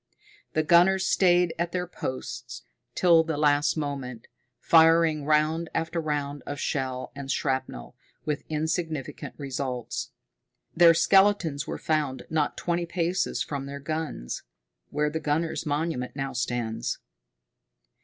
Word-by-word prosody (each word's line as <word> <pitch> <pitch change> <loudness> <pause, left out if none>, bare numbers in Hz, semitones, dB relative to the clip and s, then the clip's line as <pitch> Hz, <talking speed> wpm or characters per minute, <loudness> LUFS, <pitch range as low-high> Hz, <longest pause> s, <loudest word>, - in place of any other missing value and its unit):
The 155 - +2
gunners 180 +4 +5
stayed 180 -3 +3
at 170 0 -1
their 180 -1 -1
posts 130 -6 -6 0.3
till 170 -3 +5
the 160 -2 -3
last 145 +1 +3
moment, 135 -6 -4 0.3
firing 165 -2 +5
round 155 +2 +2
after 165 +1 -1
round 145 -2 -2
of 145 0 -4
shell 130 -3 -2
and 140 -1 -7
shrapnel, 130 - -2 0.3
with 150 -2 -1
insignificant 160 -2 -3
results. 130 -4 -4 0.7
Their 170 -1 +7
skeletons 190 -6 +3
were - - -3
found 145 -5 -1
not 155 -2 0
twenty 170 0 -1
paces 175 +1 -1
from 140 -2 -5
their 140 0 -6
guns 150 - -4 0.5
where 150 0 0
the 160 - -2
Gunners' 155 +1 -1
Monument 145 -4 -2
now 135 -1 -3
stands. 120 -3 -2
150 Hz, 125 wpm, -27 LUFS, 140-165 Hz, 0.7 s, Their